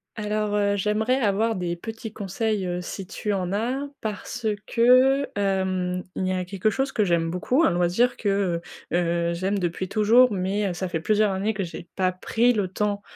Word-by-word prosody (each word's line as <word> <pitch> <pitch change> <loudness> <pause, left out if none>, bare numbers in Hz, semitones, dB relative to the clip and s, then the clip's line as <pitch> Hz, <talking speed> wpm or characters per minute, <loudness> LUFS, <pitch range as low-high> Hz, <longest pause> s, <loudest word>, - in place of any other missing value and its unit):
Alors, 210 -1 -1
heu, 200 -1 +2
j'aimerais 215 +6 +1
avoir 220 0 +1
des 175 -2 -2
petits 225 +4 -7
conseils, 205 -1 -2
heu, 180 0 -2
si 185 +2 -6
tu 210 +1 -3
en 185 -2 -2
as, 250 +7 -1
parce 220 +2 -5 0.2
que, 255 +4 +4
hem, 190 -2 0
il 185 - -1
y - - 0
a 185 -1 -2
quelque 195 +3 0
chose 270 +5 -1
que 215 - +1
j'aime 170 -3 +1
beaucoup, 250 - +1
un - - +4
loisir 180 +8 +2
que, 195 -5 0 0.3
heu 175 - +3
heu, 170 0 0
j'aime 190 +4 -1
depuis 180 0 -2
toujours, 225 +4 +5
mais 195 +1 -1
heu, - - -3
ça 185 +1 -3
fait 170 -2 -2
plusieurs 210 +4 +2
années 200 +3 -1
que 195 - -1
j'ai 170 0 -8
pas 185 -1 +1
pris 230 +6 +1
le 205 -4 0
temps, 205 +2 -2
200 Hz, 195 wpm, -24 LUFS, 180-220 Hz, 0.3 s, toujours